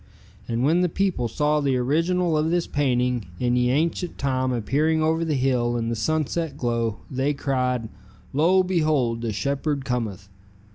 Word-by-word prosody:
And 115 +1 -1
when 165 +6 +3
the 180 - +2
people 175 -9 0
saw 150 +6 +1
the 135 -3 +1
original 165 +6 +1
of 155 +1 +1
this 175 0 +1
painting 125 - 0
in 120 0 +1
ye 125 0 +2
ancient 165 +6 0
time 130 -2 0
appearing 150 +7 +1
over 160 +1 +1
the 160 -3 0
hill 125 -2 +1
in 115 -1 -2
the 115 - -1
sunset 155 +4 -1
glow, 115 -4 -1
they 135 +3 0
cried: 125 -4 -1 0.5
'Lo, 175 +7 +4
behold 155 -10 +1
the 115 -2 -2
shepherd 140 +6 -2
cometh.' 110 -7 -3
135 Hz, 160 wpm, -24 LUFS, 120-155 Hz, 0.5 s, Lo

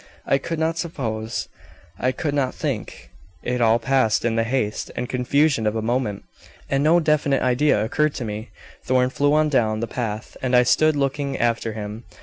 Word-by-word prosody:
"I 135 - +2
could 165 +4 -4
not 160 +1 0
suppose; 115 -9 -3 0.5
I 130 - +1
could 145 +1 -3
not 135 -3 0
think; - - -5 0.3
it 125 0 -1
all 115 0 +5
passed 125 -3 +1
in 115 -1 +1
the 115 - +2
haste 115 -3 -2
and 125 - -3
confusion 130 -1 +1
of 105 - 0
a 110 - -1
moment, 115 -3 -1 0.5
and 135 +1 +2
no 165 +3 +5
definite 150 -4 +1
idea 130 0 +2
occurred 150 +6 0
to 125 - -4
me. 110 +2 -5 0.3
Thorn 130 0 +2
flew 145 +2 +2
on 155 0 +3
down 110 -6 +1
the 115 - -1
path, 110 -3 -5
and 130 -1 +1
I 125 - +6
stood 155 +5 +3
looking 140 0 -1
after 115 -1 0
him. 105 +1 -7
125 Hz, 185 wpm, -22 LUFS, 115-145 Hz, 0.5 s, I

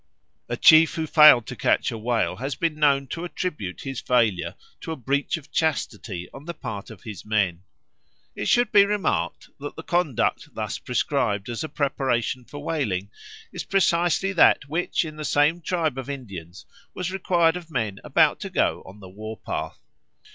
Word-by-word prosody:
A - - -2
chief 160 0 +7
who 160 - -1
failed 150 -7 +7
to - - -7
catch - - +1
a 115 - -5
whale 115 0 0
has 135 +2 -3
been 165 -2 0
known 140 -2 +2
to 165 - -5
attribute 150 - -4
his 135 -1 -5
failure 115 -8 +1 0.2
to - - -6
a - - -2
breach 140 +4 -1
of 155 -2 -14
chastity 105 - -2
on 135 +2 -11
the 170 0 -6
part 110 -8 -6
of - - -13
his 105 -6 -8
men. 100 -5 0 0.7
It 105 - -3
should 240 -2 +3
be 200 - +7
remarked 205 0 -1
that - - -7
the - - -8
conduct 175 - 0
thus - - -3
prescribed 100 0 -1
as 120 +3 -3
a 155 - -5
preparation 130 -3 -1
for 145 +2 -9
whaling 105 - -2 0.4
is - - -4
precisely 175 0 +1
that 165 -5 +5
which 165 +3 -1
in 155 -1 -8
the 155 - -5
same 150 +4 +2
tribe 160 -5 -1
of 130 +1 -7
Indians 95 - -8 0.3
was 180 -1 -3
required 175 -3 +2
of 175 -2 -7
men 110 -9 -2
about - - +3
to - - -5
go - - 0
on 100 +2 -13
the 95 - -11
war 110 +3 -8
path. 80 +1 -5
140 Hz, 180 wpm, -24 LUFS, 110-165 Hz, 0.7 s, chief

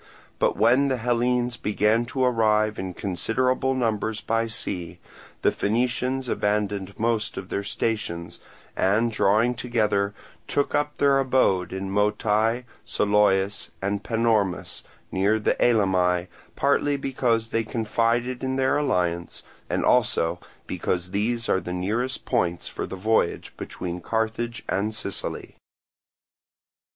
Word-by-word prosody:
But - - +2
when 125 +5 +4
the 130 -2 0
Hellenes 120 0 +1
began 105 +3 +1
to 130 +2 -2
arrive 110 -3 +2
in 95 -1 -4
considerable 125 +8 0
numbers 110 -3 -1
by 115 +1 0
sea, 90 -6 -4 0.5
the - - +4
Phoenicians 125 +4 0
abandoned 105 -3 -1
most 115 -1 0
of 95 - -6
their 100 - -1
stations, 100 -5 -3 0.4
and 110 +5 +2
drawing 110 +3 +3
together 105 -4 0 0.3
took 145 - 0
up 145 0 0
their 140 -1 +4
abode 125 -9 +2
in 95 0 -4
Motye, 105 +3 +1 0.2
Soloeis, 100 -1 +2
and 100 +1 -1
Panormus, 110 -5 0 0.3
near 100 +4 +2
the 110 - +1
Elymi, 95 -6 +2 0.3
partly 140 +1 +2
because 120 -4 0
they 115 0 0
confided 115 +3 0
in 130 0 -1
their 130 +1 +2
alliance, 90 -11 -1 0.3
and - - 0
also 85 +2 +2 0.3
because 90 0 -2
these 115 +4 -1
are - - +2
the 90 - -6
nearest 110 +8 -2
points 90 -9 0
for - - -5
the - - -6
voyage 105 -2 0
between 90 0 -6
Carthage 115 +3 -2
and 105 +3 -1
Sicily. 100 -3 -5
110 Hz, 125 wpm, -25 LUFS, 100-120 Hz, 0.5 s, when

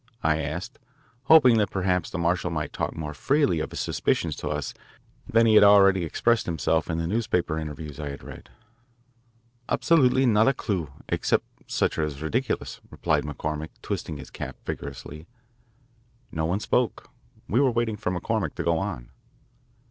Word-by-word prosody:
I 80 0 +2
asked, 80 +5 -5 0.5
hoping 135 -7 +7
that 105 -2 +1
perhaps 90 -3 0
the - - -5
marshal 85 +1 0
might 80 -3 -3
talk - - -3
more 75 -1 -5
freely 140 - +1
of - - -3
his - - -4
suspicions - - 0
to 75 - -4
us 75 -1 -3 0.5
than 115 +1 +4
he 110 - +4
had 105 - +8
already 100 -2 +6
expressed 115 +8 +1
himself 80 -1 0
in 80 - -1
the 85 - -1
newspaper 90 -5 0
interviews 75 -2 -7
I 75 -1 -4
had 70 -1 -8
read. - - -11 1.2
"Absolutely 130 -5 +3
not 110 -1 +4
a 135 - +3
clue 90 - -3 0.2
except - - +1 0.2
such - - 0
as 75 -3 -2
are 80 - -5
ridiculous," 125 +11 -2
replied - - 0
McCormick, 75 +1 -4
twisting 75 - -4
his - - -10
cap - - -6
viciously. 75 +3 -7 1.0
No 80 0 -1
one 95 +5 -1
spoke. 125 +1 0 0.4
We 115 - +2
were 135 - +4
waiting 120 -2 0
for 105 -2 -3
McCormick 90 -2 -2
to - - -3
go 85 -1 +1
on. - - -5
90 Hz, 165 wpm, -26 LUFS, 75-110 Hz, 1.2 s, had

